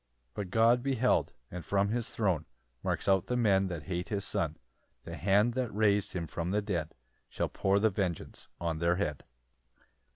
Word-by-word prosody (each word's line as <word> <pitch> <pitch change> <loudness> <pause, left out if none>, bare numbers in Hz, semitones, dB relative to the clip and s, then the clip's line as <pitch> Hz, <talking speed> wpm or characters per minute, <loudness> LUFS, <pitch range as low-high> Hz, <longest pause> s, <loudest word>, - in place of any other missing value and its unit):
] 60 - -44
8 - - -44
But 95 +4 -4
God 115 +4 +4
beheld; 130 -2 +1 0.2
and 90 -1 -6
from 100 0 +1
his 115 +1 -2
throne 90 -8 0 0.3
Marks - - -2
out 95 -2 +3
the 125 - 0
men 100 -5 +3
that 85 -5 -5
hate 90 -1 -3
his 100 -2 -2
Son; 80 -6 -2 0.5
The - - -7
hand 105 +5 +3
that 125 -2 -1
rais'd 105 -1 +2
him 90 -3 -2
from 85 +2 -4
the 105 +3 +2
dead 85 -6 -2 0.3
Shall - - -2
pour 95 +1 +1
the 110 +1 +3
vengeance 90 -4 -3
on 85 -2 -2
their 85 +1 +2
head. 75 -7 -2
100 Hz, 190 wpm, -31 LUFS, 85-110 Hz, 0.5 s, God